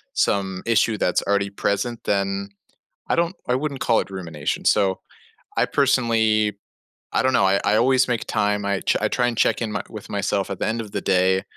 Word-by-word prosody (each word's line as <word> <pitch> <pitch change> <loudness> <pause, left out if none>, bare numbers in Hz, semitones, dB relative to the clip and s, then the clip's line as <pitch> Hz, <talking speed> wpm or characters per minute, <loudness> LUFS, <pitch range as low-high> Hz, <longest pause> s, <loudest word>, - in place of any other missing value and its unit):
some 95 -2 0
issue 115 -1 +3
that's 90 - +1
already 100 0 0
present, 115 +4 -2
then 100 0 -1 0.6
I - - +1
don't 170 +2 +1
I 125 - +2
wouldn't 140 -1 -3
call 115 - +3
it - - -6
rumination. 85 -6 -4
So, 95 -3 +2 0.6
I - - +4
personally 110 -6 +2 0.5
I - - +2
don't 130 0 +2
know. 100 - +4
I 95 +1 +3
I 105 - +3
always 130 0 +3
make 120 -3 -1
time. 105 0 0
I 100 -1 -1
tr - - +1
I - - +2
try 120 -1 +1
and 120 - -3
check - - +2
in 110 -3 -3
with 110 -2 -9
myself 100 -1 -1
at 95 - -5
the - - -1
end 115 +1 -1
of 105 - -9
the - - -3
day. 95 0 +2
105 Hz, 200 wpm, -22 LUFS, 100-115 Hz, 0.6 s, I